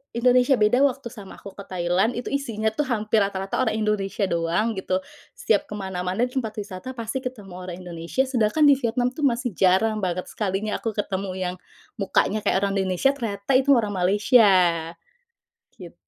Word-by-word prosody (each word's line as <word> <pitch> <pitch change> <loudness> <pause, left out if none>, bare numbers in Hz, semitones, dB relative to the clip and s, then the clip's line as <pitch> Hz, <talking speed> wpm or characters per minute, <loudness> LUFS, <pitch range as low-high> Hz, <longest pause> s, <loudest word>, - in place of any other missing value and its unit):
Indonesia. 250 +3 +4
Beda 210 +4 +3
waktu 275 -2 0
sama 205 -6 -11
aku 200 - -10
ke 200 - -9
Thailand, 180 +5 +1
itu 245 - -5
isinya 230 -6 -2
tuh 285 +5 -2
hampir 220 -2 +1
rata-rata 195 -1 -3
orang 220 -4 0
Indonesia 210 -1 -1
doang, 170 +6 0
gitu. 185 0 -1 0.4
Setiap 210 -3 +1
ke - - -4
mana-mana 190 +2 -2
di 250 - -14
tempat 220 -5 -2
wisata 200 +5 -7
pasti 235 +3 -4
ketemu 210 -7 -7
orang 180 -1 -7
Indonesia. 170 +8 -2
Sedangkan 245 +3 +1
di 285 - +7
Vietnam 245 0 0
tuh 305 - -5
masih 245 -1 -1
jarang 195 +5 +3
banget. 180 0 -2
Sekalinya 210 +1 -2
aku 225 - -2
ketemu 195 -2 -3
yang 180 -1 -2 0.4
mukanya 200 +2 +1
kayak 200 - +2
orang 195 - -2
Indonesia, 190 +8 +2
ternyata 210 -3 -4
itu 275 +1 -2
orang 215 -4 0
Malaysia, 205 +4 +4 1.3
git. - - -11
210 Hz, 170 wpm, -24 LUFS, 190-245 Hz, 1.3 s, di